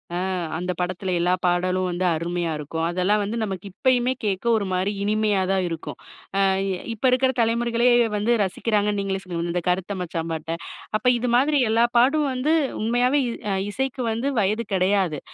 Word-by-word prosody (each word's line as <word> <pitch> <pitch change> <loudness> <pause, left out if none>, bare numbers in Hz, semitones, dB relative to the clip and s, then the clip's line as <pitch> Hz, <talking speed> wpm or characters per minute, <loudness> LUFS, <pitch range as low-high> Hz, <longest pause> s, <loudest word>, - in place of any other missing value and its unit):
அ. - - -1 0.4
அந்தப் 180 0 -3
படத்துல, 185 +1 -2
எல்லா 175 +1 +2
பாடலும் 180 +1 +1
வந்து 175 +1 -2
அருமயா 170 +1 -2
இருக்கும். 150 +2 -4
அதெல்லாம் 185 +4 +1
வந்து 210 +4 -3
நமக்கு 195 -3 -4
இப்பயுமே 255 +4 +2
கேக்க 200 0 -1
ஒரு 205 - -2
மாரி 185 +2 0
இனிமையா 210 -1 +1
தான் 190 -1 +1
இருக்கும். 165 -1 -6 0.4
ஆ - - +2 0.3
இ - - -1 0.2
இப்ப 225 +4 -4
இருக்கிற 260 +1 +3
தலைமுறைகளே 235 +1 +2 0.3
வந்து 210 +3 0
ரசிக்கிறாங்க. 210 +2 0
நீங்களே 195 -1 -2
சொன்னீங்க, 170 -2 -4
அந்த 180 - 0
கருத்த 190 +2 -1
மச்சான் 165 -1 -4
பாட்ட. 160 0 -3 0.4
அப்ப 250 - -3
இது 245 +1 -1
மாதிரி 285 +4 +3
எல்லா 225 +1 +3
பாட்டும் 285 +5 +4
வந்து 265 +5 +1 0.3
உண்மையாவே 245 +5 +2 0.3
அ - - +1 0.2
இசைக்கு 265 +3 -3
வந்து 230 +5 -2
வயது 215 +3 0
கெடயாது. 185 -4 +1
200 Hz, 170 wpm, -23 LUFS, 180-235 Hz, 0.4 s, பாட்டும்